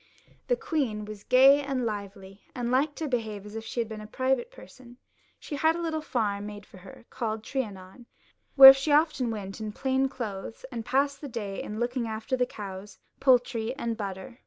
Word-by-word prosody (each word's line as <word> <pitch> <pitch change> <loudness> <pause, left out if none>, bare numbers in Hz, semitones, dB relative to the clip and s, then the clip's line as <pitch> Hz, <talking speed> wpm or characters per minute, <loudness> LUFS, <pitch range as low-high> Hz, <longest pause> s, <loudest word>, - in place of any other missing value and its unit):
The - - +3
queen 250 - -2
was 210 -1 -9
gay 270 +3 +6
and 270 -3 -2
lively, 200 -2 -6
and 240 -1 -2
liked 280 +3 +1
to 315 - -4
behave 220 -6 -3
as 210 +1 -10
if 225 - -5
she 240 - -5
had 230 - 0
been 215 -1 -7
a 210 - -9
private 265 - -1
person; 250 - -15 0.4
she 295 - -6
had 320 +3 +3
a - - -4
little 320 -2 -2
farm 205 -8 -2
made 205 -1 -9
for - - -16
her, 190 +5 -14
called 220 -2 -3
Trianon, 215 -3 -6 0.5
where 270 -1 +13
she 270 +3 -2
often 290 -4 +3
went 205 -2 -6
in 215 -1 -4
plain 265 +3 0
clothes, 225 -2 -6
and 230 -3 -5
passed 280 +4 0
the 290 - -6
day 210 -5 -5
in 210 +1 -6
looking 240 0 -1
after 220 +3 -3
the 250 -1 0
cows, 200 -2 -9 0.2
poultry, 245 -2 +2
and 235 -4 -3
butter. 205 +4 -7
235 Hz, 195 wpm, -27 LUFS, 210-270 Hz, 0.5 s, where